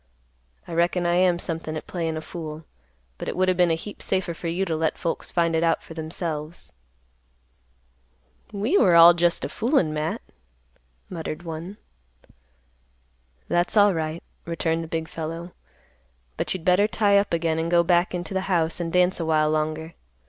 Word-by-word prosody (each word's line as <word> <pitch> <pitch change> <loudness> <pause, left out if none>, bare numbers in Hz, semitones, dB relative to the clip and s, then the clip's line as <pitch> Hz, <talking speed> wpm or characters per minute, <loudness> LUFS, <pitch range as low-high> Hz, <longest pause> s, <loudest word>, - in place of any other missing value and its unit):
I - - -7
reckon 175 +1 +1
I 175 - +2
am 180 0 +3
somethin' 165 -2 -4
at - - -7
playin' 165 -3 -3
a - - -4
fool, 155 -1 -7 0.5
but - - -5
it - - -5
would 185 0 +3
o' - - +2
been 180 -1 +3
a 165 - +2
heap 205 +6 -9
safer 185 -2 -1
for 165 +1 -6
you 175 +4 -1
to 165 -3 -1
let 160 0 -1
folks 170 - -3
find 170 -1 +1
it 160 - +2
out 165 -1 +1
for - - -11
themselves." 160 - -5 1.8
"We 215 - -1
all - - +5 0.2
were - - +6
jest 170 0 +1
a - - -2
foolin', 225 - +1
Matt," 155 +1 -3 0.8
muttered 165 -1 -6
one. 170 +4 -7 1.7
"That's 175 +5 +1
alright," 170 -6 +2 0.2
returned 165 -1 -1
the - - -7
big 160 0 -3
fellow; 165 +2 -6 0.8
"But - - -2
you'd 175 -3 -7
better 185 +3 +4
tie 205 -2 +3
up 200 - -2
again 165 -1 0
and 165 +1 -1
go 170 0 +4
back 175 +1 +2
into 180 +2 -5
the 190 +1 -2
house 165 -3 +1
and 170 -1 -3
dance 180 +1 +2
a 165 - -2
while 155 -1 +2
longer. 155 +1 -2
170 Hz, 175 wpm, -24 LUFS, 160-180 Hz, 1.8 s, were